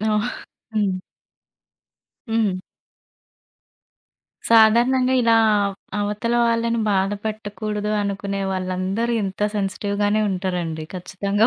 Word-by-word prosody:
ఆ! 215 - -3 0.7
హ్మ్. 195 -4 0 1.3
హ్మ్. 210 -5 +1 1.9
సాధారణంగా 240 +4 +5
ఇలా 230 0 +4 0.3
అవ్ 200 -1 -2 0.2
అవతల 210 +3 -1
వాళ్ళని 230 0 +1
బాధ 195 0 +2
పెట్టకూడదు 210 -1 -3
అనుకునే 200 0 -3
వాళ్ళందరూ 185 +5 -1
ఇంత 195 +1 -5 0.2
సెన్సిటివ్ 200 +1 -2
గానే 210 +1 +2
ఉంటారండి 175 -4 -2
ఖచ్చితంగా 200 +4 0
205 Hz, 90 wpm, -22 LUFS, 190-225 Hz, 1.9 s, సాధారణంగా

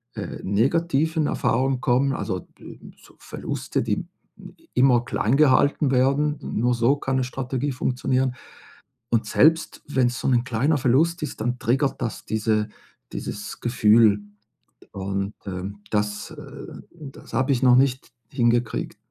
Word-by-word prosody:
äh, - - -6
negativen 155 - +1
Erfahrungen 130 +1 0
kommen, 135 +2 +2
also, 100 -6 -4
äh, - - -11 0.3
so - - -19
Verluste, - - -4
die - - -2 0.5
i - - -26
immer 125 -2 +4
kleingehalten 140 +3 +3
werden, 140 +3 +2
n - - -4
nur 125 +2 +2
so 120 +4 +3
kann 135 -2 -2
'ne 130 - +1
Strategie 130 +2 -3
funktionieren. 130 0 0 0.8
Und 115 -1 +2
selbst 160 +8 +2
wenn's 125 -3 +1
so - - -1
'nen 125 -2 +2
kleiner 130 +5 +1
Verlust 155 +7 +2
ist, 150 - -5
dann 125 +3 -1
triggert 135 +3 0
das 115 -3 -4
diese 110 0 0 0.4
dieses - - -6
Gefühl. 110 -3 +4 0.7
Und, 100 +1 -3
ähm, 95 +2 -6
das, 105 -1 -2
äh - - -10
das 150 -5 -12
habe 135 +2 +2
ich 130 -1 0
noch 125 -1 +6
nicht 130 0 +1 0.2
hingekriegt. 120 -2 0
125 Hz, 140 wpm, -24 LUFS, 115-135 Hz, 0.8 s, noch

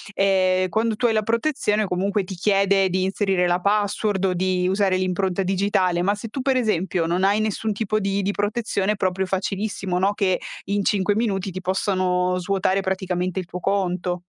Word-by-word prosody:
ehm, 185 -1 +2
quando 220 +4 0
tu 245 - -1
hai 230 - +3
la 215 - +2
protezione 225 -2 0
comunque 195 +2 -1
ti 185 - -7
chiede 195 0 +2
di 185 +1 0
inserire 190 -1 +1
la 175 +1 +1
password 205 0 0
o 185 - +1
di 180 0 0
usare 190 -1 +2
l'impronta 185 +1 -1
digitale. 185 -2 +1
Ma 200 +3 +1
se 215 +2 -7
tu 265 - -4
per 265 0 +1
esempio 190 -7 0
non 175 +3 0
hai 200 +2 +3
nessun 215 0 -1
tipo 215 +1 -1
di 200 0 -1
di 200 - 0
protezione 205 0 -1
è - - -5
proprio 190 0 -1
facilissimo, 190 -1 -2
no, 195 +2 +2
che 190 -3 +1 0.3
in 200 +1 -1
5 200 0 +1
minuti 200 -4 -1
ti 185 - -6
possano 185 -1 0
svuotare 195 +1 0
praticamente 185 -1 -2
il 185 - -5
tuo 180 +1 -7
conto. 180 -2 -1
195 Hz, 190 wpm, -23 LUFS, 185-205 Hz, 0.3 s, hai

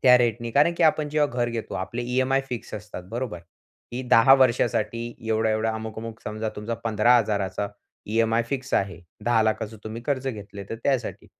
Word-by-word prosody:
त्या 125 -1 +8
रेट 120 -3 +2
ने. 120 0 -4
कारण 145 +7 +4
की - - +1
आपण 155 -1 +3
जेव्हा 150 0 +2
घर 120 - +2
घेतो 115 -2 -4
आपले 95 +6 -3
ईएमआय 130 +2 +1
फिक्स 120 -4 -5
असतात, 105 -3 -7
बरोबर? 120 -6 -3 0.5
की 125 +2 -3
10 125 +4 +8
वर्षासाठी 120 -2 +1
एवढा-एवढा, 110 0 +1
अमुक-अमुक. 110 0 -6
समजा 110 +1 -3
तुमचा 105 +3 -3
15000चा 105 -3 +2 0.4
ईएमआय 115 +2 +2
फिक्स 135 0 -4
आहे. 95 -4 0 0.2
1000000चं 110 -2 +1
तुम्ही 110 +2 -6
कर्ज 135 -2 0
घेतलं 100 -3 -7
तर - - -2
त्यासाठी. 130 -4 -1
115 Hz, 165 wpm, -25 LUFS, 110-125 Hz, 0.5 s, त्या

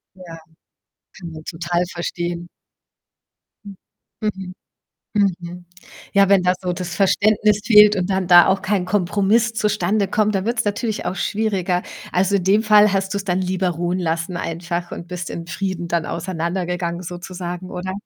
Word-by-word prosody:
Ja, 175 -3 -11 0.8
kann 170 -3 -8
man 155 -1 -9
total 175 +1 -2
verstehen. 175 0 -4 1.2
Hm. 200 -1 -9 0.5
Mhm, 190 -4 -4 0.9
mhm. 175 +1 -9 0.5
Ja, 200 -1 +4
wenn 195 -2 +5
da 180 0 +3
so 180 -1 -2
das 175 -1 -5
Verständnis 210 +2 +3
fehlt 210 -2 +7
und 185 0 -1
dann 190 -1 0
da 175 -1 +8
auch 190 0 +1
kein 200 -2 0
Kompromiss 205 +4 +1
zustande 210 -2 0
kommt, 215 0 +1
da 190 -1 0
wird‘s 235 +1 0
natürlich 210 +1 -2
auch 185 - -2
schwieriger. 195 -5 -1 0.3
Also, 190 +2 +2
in 185 - -2
dem 200 +3 +3
Fall 210 -1 +5
hast 195 0 -1
du‘s 200 -1 -2
dann 185 -2 0
lieber 185 0 0
ruhen 175 +2 -2
lassen 165 +1 -2
einfach 170 +1 -4
und 170 - -7
bist 180 0 -5
in 165 - -6
Frieden 175 -1 -4
dann 170 -1 0
auseinandergegangen 175 0 -3
sozusagen, 180 0 -7
oder? 185 +1 -4
185 Hz, 155 wpm, -20 LUFS, 175-200 Hz, 1.2 s, da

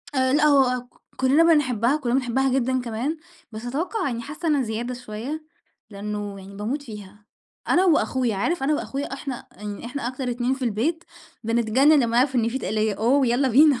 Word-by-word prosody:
آآ 260 0 +2
لأ، 300 - +3
هو 265 -4 +4
ك 245 - -24 0.2
كُلّنا 270 +5 +4
بنحبّها، 270 -6 +3
كَلّنا 250 -4 -1
بنحبّها 265 +1 +1
جدًا 260 +1 0
كمان، 245 +7 -3 0.3
بس 220 +2 -8
أتوقَّع 350 - -2
يعني 235 -3 -3
حاسّة 305 +6 -6
أنا 290 -3 +3
زيادة 230 +3 -3
شوية، 250 +6 -6 0.5
لإنّه 205 0 -5
يعني 195 +1 -11
باموت 235 +8 -3
فيها. 210 -4 -11 0.4
أنا 360 +2 +4
وأخويا، 260 - +2
عارف 330 - -1
أنا 295 +3 +2
وأخويا 275 -1 -4
إحنا 270 -2 -6
يعني 210 +2 -7
إحنا 250 0 -4
أكتر 255 0 -4
اتنين 245 +2 0
في 265 - -9
البيت 265 +10 -1 0.4
بنتجنّن 235 +6 +4
لمّا 235 0 0
نعرف 260 +2 +3
إن 230 -2 +2
فيه 260 +3 -2
تَقْلية، 215 -1 -1
أوه، 255 +6 +2
يالّا 250 +3 +2
بينا. 275 +1 +5
250 Hz, 185 wpm, -24 LUFS, 225-280 Hz, 0.5 s, بينا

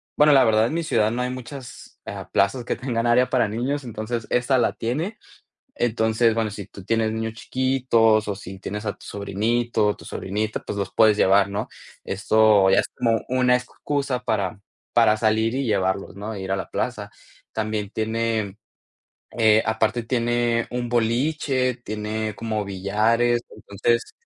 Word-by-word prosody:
bueno, 150 0 +5
la 135 -2 +7
verdad, 110 0 +3
en - - -4
mi 170 - -1
ciudad 110 -9 +2
no 120 +2 -2
hay 125 - -2
muchas, 130 0 -9
ah, - - -7
plazas 110 +5 +1
que - - -1
tengan 120 -2 -2
área 125 +2 +4
para 125 -3 +3
niños, 125 +7 -2 0.5
esa 125 +2 +2
la - - +2
tiene. 160 - -3 0.6
Entonces, 110 -1 +2
bueno, 115 -2 0
si 100 -1 -7
tú 100 - -12
tienes 115 0 +1
niños 110 0 -3
chiquitos 115 -4 +2
o 100 - -1
si 95 -1 -9
tienes 105 +2 -5
a 105 - 0
tu - - -16
sobrinito 105 +3 0
o 105 - 0
tu - - -14
sobrinita, 105 +3 -3
pues 100 - -4
los 100 -1 -3
puedes 110 -2 +5
llevar, 100 0 +4
¿no?, 100 +2 -3 0.4
esto 105 -1 +4
ya - - +5
es - - -5
como 115 -2 +1
una 125 0 +3
excusa 130 +1 -3
para 100 -3 -1 0.3
para 115 -2 +4
salir 110 +1 +1
y 135 - -1
llevarlos, 95 -4 -1
¿no?, 105 +2 -5
ir 95 0 -4
a 95 - +1
la 95 - -5
plaza. 105 -5 -3 0.4
También 110 -2 -2
tiene, 110 -2 -1 0.8
eh, 110 -1 +5
aparte 110 +2 0
tiene 120 0 0
un 120 -1 -3
boliche, 130 +2 +1
tiene 110 -2 -4
como 110 -1 -3
billares, 110 +5 +1
entonces 115 +4 -1
110 Hz, 165 wpm, -23 LUFS, 105-120 Hz, 0.8 s, la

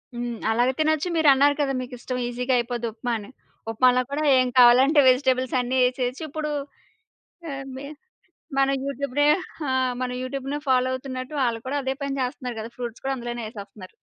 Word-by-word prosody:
హ్మ్. 240 -1 -4
అలాగే 245 +3 +2
తినొచ్చు. 315 +2 +1
మీరు 315 -2 +3
అన్నారు 285 +2 +4
కదా! 270 -1 0
మీకు 250 0 -8
ఇష్టం 250 0 -4
ఈసీగా 250 +2 -1
అయిపోద్ది 240 -1 -2
ఉప్మా 240 +2 -4
అని. 205 +1 -10 0.4
ఉప్మాలో 250 +2 +4
కూడా 300 +2 -1 0.2
ఏం 255 - +2
కావాలంటే 260 +5 +7
వెజిటబుల్స్ 255 -1 +2
అన్ని 255 +2 -1
ఎసేయొచ్చు. 255 +2 -3
ఇప్పుడు 300 +1 -4 1.0
ఎ - - -4 0.2
బి 275 - -7 0.7
మన 270 0 +4 0.2
యూట్యూబ్ 280 -1 -4
రె 290 - +5 0.4
ఆ! - - +1 0.5
యూట్యూబ్‌నే 275 +2 -4
ఫాలో 255 0 +3
అవుతున్నట్టు 260 +1 -5
వాళ్ళు 235 -2 0
కూడా 285 +2 -2
అదే 265 0 -1
పని 275 -1 -2
చేస్తున్నారు 250 -2 -4
గదా! 225 +2 -7
ఫ్రూట్స్ 240 -1 -6
కూడా 270 0 0
అందులోనే 240 -1 -5
ఏసేస్తున్నారు. 200 -3 -10
255 Hz, 165 wpm, -24 LUFS, 240-275 Hz, 1.0 s, కావాలంటే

